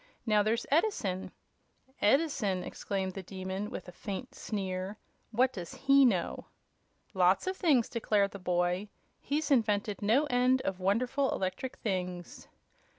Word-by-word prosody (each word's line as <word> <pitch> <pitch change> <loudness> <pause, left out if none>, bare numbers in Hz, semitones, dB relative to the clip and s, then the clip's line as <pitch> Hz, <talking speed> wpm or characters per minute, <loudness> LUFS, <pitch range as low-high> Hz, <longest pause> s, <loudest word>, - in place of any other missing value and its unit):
"Now, 215 -2 +4
there's 220 +3 0
Edison 275 - +1 0.4
" 265 +1 -35
"Edison!" 245 - +1
exclaimed 190 -2 -3
the 195 - -5
Demon, 190 +2 -5
with 230 - -7
a - - -8
faint 200 +7 -6
sneer; 190 -1 -4 0.3
"what 250 +3 +2
does 175 -4 -7
he 275 0 +5
know?" 190 -8 0 0.7
"Lots 185 -1 +3
of 375 +1 -1
things," 290 - +3
declared 210 -3 +1
the 200 - -8
boy. 180 +2 0 0.3
"He's 295 +1 -2
invented 210 -5 +2
no 230 +9 +3
end 255 -1 +2
of 190 -1 -2
wonderful 245 +9 +1
electrical 195 +8 -3
things." 180 -4 -4
210 Hz, 140 wpm, -31 LUFS, 185-255 Hz, 0.7 s, he